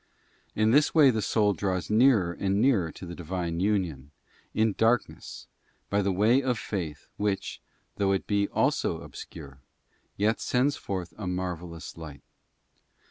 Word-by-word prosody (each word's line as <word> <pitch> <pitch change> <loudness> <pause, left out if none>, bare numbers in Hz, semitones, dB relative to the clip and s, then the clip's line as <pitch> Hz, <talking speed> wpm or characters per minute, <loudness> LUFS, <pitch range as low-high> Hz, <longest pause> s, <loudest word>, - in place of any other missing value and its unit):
In 110 +1 +3
this 145 +5 +3
way 145 -4 +7
the 110 -2 -1
soul 105 0 +2
draws 95 -1 -2
nearer 110 -6 +4
and 100 +2 0
nearer 105 -10 +2
to - - -10
the 85 - -7
Divine 85 -1 -3
union, 90 -9 -1 0.4
in 110 -1 +1
darkness, 115 +1 -1 0.5
by 100 0 +2
the 100 0 +1
way 110 +8 +3
of 125 -3 0
faith 85 -9 -5
which, 100 -2 -2 0.4
though 100 -1 +2
it 95 - 0
be 100 -1 +1
also - - 0
obscure, 70 -5 -10 0.6
yet 110 +3 +1
sends 135 +3 +1
forth 95 -8 -5
a 100 - -4
marvellous 90 -3 -5
light. 75 -4 -10
100 Hz, 145 wpm, -27 LUFS, 85-110 Hz, 0.6 s, way